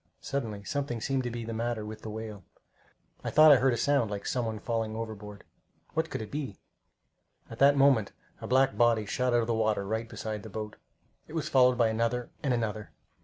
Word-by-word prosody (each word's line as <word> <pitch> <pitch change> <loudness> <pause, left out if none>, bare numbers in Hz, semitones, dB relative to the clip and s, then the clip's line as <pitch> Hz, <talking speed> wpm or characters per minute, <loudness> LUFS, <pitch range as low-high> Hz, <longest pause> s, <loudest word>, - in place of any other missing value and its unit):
Suddenly 110 -7 -4
something 140 0 -2
seemed 135 +4 0
to - - -1
be 120 -1 -5
the 115 - -4
matter 115 -1 -2
with 110 0 -8
the 110 - -6
whale. 105 -2 -7 0.8
I - - -2
thought 155 0 +8
I 140 - +8
heard 130 +1 +3
a 120 - 0
sound 140 -6 +2
like 100 -1 -5
some 125 -3 -1
one 110 -1 -3
falling 110 0 -2
overboard. 105 -2 -7 0.5
What 160 0 0
could 115 - -4
it 110 - -10
be? 140 -9 -4 0.9
At 115 - -9
that 140 +1 +6
moment 135 -7 +4 0.3
a - - -5
black 135 +1 +3
body 115 -3 +3
shot 125 +4 0
out 120 - +4
of - - -1
the 120 - +1
water 110 -3 +1
right 110 +3 -3
beside 110 -2 -5
the 110 - -9
boat. 105 0 -6 0.5
It - - -12
was 160 -2 -2
followed 125 -2 +5
by 115 -1 +4
another 115 +2 -1
and 140 - 0
another. 110 -3 -2
115 Hz, 215 wpm, -29 LUFS, 110-130 Hz, 0.9 s, thought